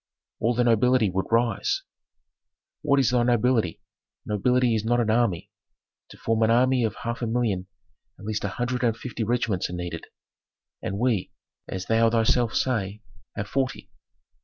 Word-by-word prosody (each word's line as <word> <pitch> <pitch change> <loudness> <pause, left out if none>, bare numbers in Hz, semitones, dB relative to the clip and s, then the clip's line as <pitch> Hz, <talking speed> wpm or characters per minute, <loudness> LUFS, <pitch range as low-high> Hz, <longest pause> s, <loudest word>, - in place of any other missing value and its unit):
"All 115 +2 +1
the 125 - +2
nobility 120 -2 +3
would 95 +1 -2
rise." 115 0 +1 1.0
"What 140 -2 +3
is 130 -2 +3
thy 125 -1 +3
nobility? 120 -5 +1 0.4
Nobility 125 +3 +2
is 110 -1 0
not 120 +2 +2
an 115 -2 +1
army. 105 -4 0 0.6
To - - -13
form 115 0 0
an 110 - +4
army 125 +2 +3
of 110 - -1
half 115 +1 -3
a 120 - -1
million, 110 -6 -1 0.5
at 100 - -12
least 110 0 -2
a - - 0
hundred 125 +5 -2
and 115 -2 +1
fifty 120 -2 -4
regiments 115 -4 0
are - - -6
needed, 90 -2 -5 0.8
and 100 - -3
we, 115 -4 0 0.4
as 95 -1 -5
thou 115 0 +3
thyself 115 +1 +2
sayest, 105 -4 -1 0.3
have 100 - -4
forty. 135 +1 -2
115 Hz, 160 wpm, -25 LUFS, 105-125 Hz, 1.0 s, an